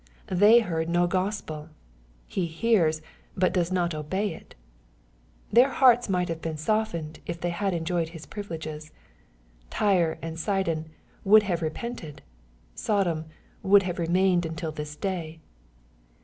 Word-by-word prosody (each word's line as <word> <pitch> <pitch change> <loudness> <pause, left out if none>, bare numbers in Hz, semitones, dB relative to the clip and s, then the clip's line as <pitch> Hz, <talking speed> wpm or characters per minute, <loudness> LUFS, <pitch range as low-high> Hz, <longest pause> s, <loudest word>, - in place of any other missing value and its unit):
— - - -29 0.2
They 225 +3 +8
heard 165 -6 -2
no 175 +1 +3
Gospel; 180 -4 -3 0.6
he 180 - -2
hears, 165 -3 +1 0.3
but 185 0 +2
does 175 -1 0
not 175 -2 0
obey 180 +6 -2
it. - - -14 0.5
— - - -31
Their 245 +4 +6
hearts 245 -4 +4
might 180 -2 +1
have 165 -1 -4
been 160 -1 -4
softened, 170 -3 -1
if 170 0 -4
they 175 0 -1
had 195 +3 -1
enjoyed 165 0 -1
his 165 -2 -10
privileges. 160 -6 -7 0.8
Tyre 175 - +2
and 165 0 -6
Sidon 170 -5 -1
'^ - - -19 0.4
would 210 +2 +7
have 175 -4 -1
repented."' 160 -2 -5 0.5
Sodom 175 - 0 0.4
"would 195 +1 +5
have 180 -1 -3
remained 175 +1 +2
until 160 0 -4
this 150 -1 -6
day.'' 165 -3 -4
170 Hz, 145 wpm, -26 LUFS, 160-195 Hz, 0.8 s, They